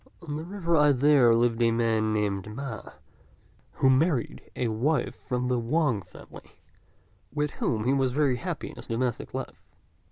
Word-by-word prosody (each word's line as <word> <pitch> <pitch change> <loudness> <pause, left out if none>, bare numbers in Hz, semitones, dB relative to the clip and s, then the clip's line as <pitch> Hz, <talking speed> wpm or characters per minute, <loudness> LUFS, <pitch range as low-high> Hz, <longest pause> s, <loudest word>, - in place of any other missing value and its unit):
On 150 -3 -5
the 155 - -4
river 170 -2 -1
I 150 -2 +5
there 130 -3 +5
lived 115 0 +1
a 115 - +4
man 115 -1 +1
named 105 -2 -1
Ma, 135 -4 -5 0.9
who - - +2
married 130 0 +2
a 120 - -1
wife 130 +8 0
from 125 0 -1
the 125 -1 +1
Wang 130 -2 +1
family, - - -15 0.7
with 150 0 -1
whom 110 -3 -1
he 130 +4 +2
was 135 -2 +1
very 135 -2 +1
happy 170 +2 -5
in - - -15
his - - -9
domestic 120 0 -2
life. - - -6
125 Hz, 165 wpm, -27 LUFS, 115-150 Hz, 0.9 s, I